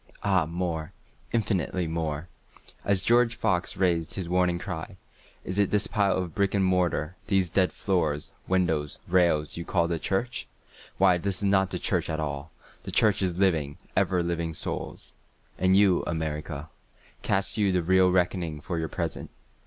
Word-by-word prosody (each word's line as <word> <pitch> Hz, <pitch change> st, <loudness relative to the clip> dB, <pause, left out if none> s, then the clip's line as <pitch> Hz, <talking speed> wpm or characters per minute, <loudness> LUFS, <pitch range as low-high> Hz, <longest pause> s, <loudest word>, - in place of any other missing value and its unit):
Ah 95 Hz, -5 st, +2 dB
more—infinitely 90 Hz, +3 st, -3 dB
more;(As 80 Hz, +4 st, -4 dB
George 120 Hz, 0 st, +4 dB
Fox 100 Hz, -6 st, 0 dB
rais'd 85 Hz, -4 st, +1 dB
his 95 Hz, -3 st, -4 dB
warning 90 Hz, 0 st, +2 dB
cry, 90 Hz, +1 st, -6 dB, 0.5 s
"Is 95 Hz, +2 st, -3 dB
it 100 Hz, -, +3 dB
this 105 Hz, -1 st, +2 dB
pile 100 Hz, -1 st, +1 dB
of 90 Hz, -3 st, -3 dB
brick 100 Hz, +2 st, +1 dB
and 95 Hz, -1 st, +3 dB
mortar—these 90 Hz, +1 st, 0 dB
dead 95 Hz, -2 st, +3 dB
floors, 80 Hz, -6 st, -1 dB
windows, 80 Hz, -6 st, 0 dB
rails—you 85 Hz, -2 st, +2 dB
call 85 Hz, -1 st, +1 dB
the 85 Hz, -1 st, -2 dB
church? 95 Hz, -, -2 dB, 0.5 s
Why 90 Hz, -2 st, +4 dB
this 100 Hz, +1 st, -1 dB
is -, -, -5 dB
not 95 Hz, -1 st, +3 dB
the -, -, -3 dB
church -, -, 0 dB
at 80 Hz, -, -2 dB
all—the 75 Hz, 0 st, -7 dB
Church 105 Hz, -3 st, +3 dB
is 90 Hz, -2 st, -1 dB
living, 80 Hz, -7 st, +1 dB, 0.2 s
ever 90 Hz, -2 st, +2 dB
living 85 Hz, -1 st, -2 dB
Souls.")And 95 Hz, +4 st, -3 dB
you, 100 Hz, -3 st, +4 dB
America, 75 Hz, -2 st, -3 dB, 0.5 s
Cast 95 Hz, +1 st, 0 dB
you 100 Hz, -2 st, +3 dB
the 90 Hz, -2 st, +1 dB
real 95 Hz, +1 st, +4 dB
reckoning 90 Hz, -3 st, 0 dB
for 85 Hz, +3 st, -3 dB
your 80 Hz, -1 st, -2 dB
present? -, -, -4 dB
90 Hz, 145 wpm, -27 LUFS, 80-95 Hz, 0.5 s, George